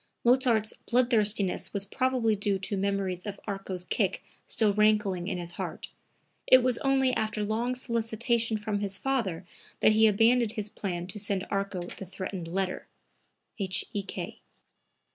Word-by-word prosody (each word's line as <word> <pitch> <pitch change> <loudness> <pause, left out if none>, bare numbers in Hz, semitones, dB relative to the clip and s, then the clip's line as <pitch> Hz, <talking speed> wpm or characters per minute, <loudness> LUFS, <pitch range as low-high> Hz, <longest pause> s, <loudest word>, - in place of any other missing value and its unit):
[Mozart's 240 -3 +3 0.2
bloodthirstiness 220 -6 +2
was 200 -1 -1
probably 250 -1 +1
due 205 -1 0
to 195 +2 -2
memories 195 -1 -1
of 200 -1 -5
Arco's 195 -3 -4
kick 195 +1 -1 0.2
still 215 -3 +2
rankling 210 -4 +2
in - - -2
his 175 -1 -4
heart. - - -5 0.6
It 255 -1 +7
was 250 -2 +1
only 265 -1 +2
after 215 -2 -1
long 230 +4 -1
solicitation 230 -1 0
from 210 -1 -2
his 200 -1 -1
father 225 -11 -1 0.3
that - - +5
he 220 +1 +5
abandoned 225 +2 +3
his 215 -2 -3
plan 175 -5 -4
to 190 +3 -7
send 195 -2 0
Arco 195 -2 -1
the 185 +2 -8
threatened 185 -1 -6
letter. 185 +2 -2 0.7
H.E.K. 195 +1 -3
210 Hz, 145 wpm, -28 LUFS, 195-230 Hz, 0.7 s, It